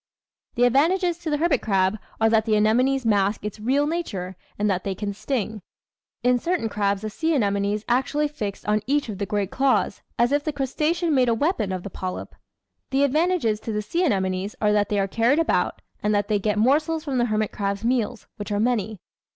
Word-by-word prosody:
The 240 Hz, -, +2 dB
advantages 335 Hz, +8 st, +3 dB
to 335 Hz, -, -4 dB
the 295 Hz, -, +1 dB
hermit 315 Hz, -4 st, +2 dB
crab 195 Hz, 0 st, +1 dB, 0.2 s
are 225 Hz, -, +4 dB
that 220 Hz, -1 st, +3 dB
the 220 Hz, -2 st, +2 dB
anemones 250 Hz, +5 st, +2 dB
mask 205 Hz, -1 st, +1 dB
its 210 Hz, 0 st, -5 dB
real 265 Hz, +7 st, +1 dB
nature 205 Hz, -, -3 dB, 0.2 s
and 210 Hz, -, +1 dB
that 185 Hz, -3 st, 0 dB
they 195 Hz, -1 st, -2 dB
can 200 Hz, +1 st, -3 dB
sting. 220 Hz, -2 st, -3 dB, 0.6 s
In 250 Hz, 0 st, +3 dB
certain 335 Hz, -6 st, -1 dB
crabs 200 Hz, -1 st, 0 dB
a 215 Hz, -, -2 dB
sea 325 Hz, +7 st, 0 dB
anemone 200 Hz, -4 st, +1 dB
is 210 Hz, -, -6 dB
actually 270 Hz, +5 st, +1 dB
fixed 215 Hz, -10 st, -5 dB
on 210 Hz, 0 st, +2 dB
each 285 Hz, -2 st, +1 dB
of 200 Hz, -3 st, -5 dB
the 200 Hz, -, -2 dB
great 205 Hz, -2 st, -1 dB
claws, 270 Hz, -1 st, +1 dB, 0.2 s
as 240 Hz, +2 st, +3 dB
if 290 Hz, 0 st, +2 dB
the 305 Hz, -, -1 dB
crustacean 305 Hz, +5 st, 0 dB
made 255 Hz, -3 st, +3 dB
a 230 Hz, -, +3 dB
weapon 225 Hz, -, 0 dB
of 185 Hz, -1 st, -4 dB
the 200 Hz, -, -7 dB
polyp. 185 Hz, +1 st, -5 dB, 0.6 s
The 270 Hz, +1 st, +2 dB
advantages 300 Hz, -6 st, +1 dB
to 225 Hz, -, -5 dB
the 210 Hz, 0 st, -2 dB
sea 335 Hz, -, -1 dB
anemones 190 Hz, -, 0 dB
are 210 Hz, -1 st, +2 dB
that 205 Hz, -1 st, +2 dB
they 210 Hz, -, 0 dB
are 195 Hz, -1 st, +1 dB
carried 230 Hz, +8 st, +2 dB
about 330 Hz, -1 st, 0 dB, 0.2 s
and 210 Hz, 0 st, +1 dB
that 205 Hz, 0 st, 0 dB
they 210 Hz, -1 st, +2 dB
get 210 Hz, +1 st, 0 dB
morsels 305 Hz, +8 st, +2 dB
from 275 Hz, -5 st, -1 dB
the 240 Hz, -, +3 dB
hermit 215 Hz, -2 st, 0 dB
crab's 200 Hz, +1 st, -3 dB
meals, 240 Hz, -3 st, 0 dB
which 205 Hz, 0 st, -6 dB
are 205 Hz, -, 0 dB
many. 220 Hz, -3 st, 0 dB
225 Hz, 215 wpm, -24 LUFS, 205-285 Hz, 0.6 s, are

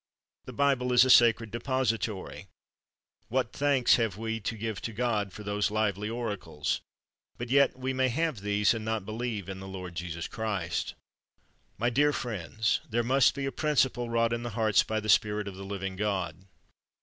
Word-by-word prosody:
The -, -, -7 dB
Bible 135 Hz, -3 st, +1 dB
is 125 Hz, +1 st, +7 dB
a 130 Hz, -, +4 dB
sacred 115 Hz, -2 st, +5 dB
depository. 120 Hz, -4 st, -2 dB, 0.8 s
What -, -, -1 dB
thanks 140 Hz, -3 st, +3 dB
have 110 Hz, -5 st, -1 dB
we 115 Hz, 0 st, -3 dB
to 115 Hz, +2 st, -4 dB
give 110 Hz, -2 st, -4 dB
to 115 Hz, -, -5 dB
God 110 Hz, -4 st, -1 dB
for 105 Hz, -, -9 dB
these 105 Hz, 0 st, 0 dB
lively 105 Hz, -1 st, -1 dB
oracles! 105 Hz, -10 st, -3 dB, 0.6 s
But 120 Hz, 0 st, -5 dB
yet 140 Hz, -1 st, +4 dB
we 130 Hz, +1 st, -2 dB
may 130 Hz, 0 st, +2 dB
have 155 Hz, -1 st, -1 dB
these 105 Hz, +1 st, +2 dB
and 110 Hz, -1 st, -4 dB
not 110 Hz, -2 st, -2 dB
believe 110 Hz, -3 st, -4 dB
in 95 Hz, -1 st, -6 dB
the 95 Hz, -, -8 dB
Lord 90 Hz, -2 st, -7 dB
Jesus 85 Hz, -1 st, -5 dB
Christ. 100 Hz, -6 st, -3 dB, 0.8 s
My 120 Hz, +3 st, +1 dB
dear 145 Hz, +4 st, +3 dB
friends, 110 Hz, -3 st, -1 dB
there 120 Hz, +2 st, +1 dB
must 130 Hz, +2 st, +4 dB
be 140 Hz, -1 st, -3 dB
a 135 Hz, -, -2 dB
principle 130 Hz, -6 st, +1 dB
wrought 115 Hz, 0 st, +1 dB
in 115 Hz, -, -2 dB
the 120 Hz, -, -4 dB
heart 110 Hz, -3 st, +4 dB
by 110 Hz, 0 st, 0 dB
the 110 Hz, -, -6 dB
Spirit 105 Hz, -1 st, +3 dB
of 100 Hz, -, -5 dB
the 95 Hz, -, -8 dB
living 95 Hz, -1 st, -5 dB
God. 95 Hz, -3 st, -2 dB
110 Hz, 180 wpm, -29 LUFS, 100-120 Hz, 0.8 s, is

